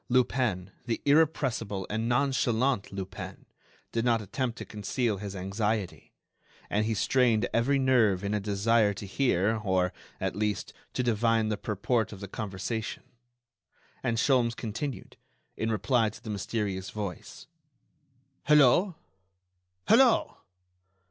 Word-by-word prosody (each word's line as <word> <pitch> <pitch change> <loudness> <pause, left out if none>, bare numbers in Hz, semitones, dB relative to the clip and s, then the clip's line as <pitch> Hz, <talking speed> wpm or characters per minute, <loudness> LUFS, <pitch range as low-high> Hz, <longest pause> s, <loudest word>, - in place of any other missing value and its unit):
Lupin, 120 -7 +1 0.2
the 115 - -1
irrepressible 140 - +2
and 110 +2 -2
nonchalant 125 -2 +1
Lupin, 95 -1 -7 0.5
did 115 - 0
not 120 -2 +3
attempt 115 +4 -3
to - - -6
conceal 105 +1 -2
his 100 0 -6
anxiety, 100 +1 -2 0.6
and 105 +1 +1
he 110 - 0
strained 120 -1 +2
every 130 +5 +2
nerve 120 -8 +3
in 100 +1 -1
a 105 - +1
desire 105 +1 +2
to 100 - -7
hear 110 -1 +1
or, 95 -3 +1 0.3
at - - -2
least, 105 0 -2 0.2
to 125 - 0
divine 115 -1 +2
the 105 - 0
purport 110 +3 -1
of 100 - -9
the 100 - -7
conversation. 110 +3 -4 1.0
And 115 -3 -1
Sholmes 120 -2 +2
continued, 120 +5 -5 0.4
in 110 0 -1
reply 110 +2 +2
to 110 +2 -14
the 110 - -5
mysterious 100 -2 -3
voice: 100 -5 -6 1.0
"Hello!... 150 +5 +5 0.9
Hello!... 245 0 +4
110 Hz, 125 wpm, -28 LUFS, 100-125 Hz, 1.0 s, Hello